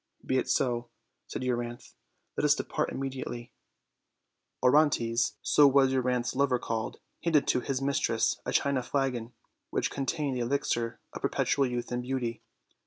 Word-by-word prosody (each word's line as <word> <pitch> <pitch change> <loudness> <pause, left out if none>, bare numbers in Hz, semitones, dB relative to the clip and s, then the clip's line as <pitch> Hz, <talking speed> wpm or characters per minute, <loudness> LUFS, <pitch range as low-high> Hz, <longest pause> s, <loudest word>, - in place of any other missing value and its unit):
"Be 130 - +2
it - - -3
so," 120 -2 +1 0.4
said - - -5
Euryanthe; 120 -1 -3 0.4
"let - - -1
us 150 0 +5
depart 150 - -2
immedi 135 -1 -4
ately." 120 -1 -7 1.1
Orontes 125 -4 +3
(so 145 -1 +6
was 135 -1 +4
Euryanthe's 125 -1 0
lover 135 -2 +3
called) 115 -2 -3 0.2
handed 160 -4 +3
to - - +3
his 135 +1 -2
mistress 140 0 +1
a - - -3
china 140 -2 +2
flagon, 125 -3 -1 0.4
which - - -1
contained 140 0 -1
the 125 - -1
elixir 120 -2 -1
of - - -7
perpetual 140 -2 +1
youth 120 0 -4
and 120 0 -1
beauty. 125 -3 -3
130 Hz, 150 wpm, -29 LUFS, 120-140 Hz, 1.1 s, so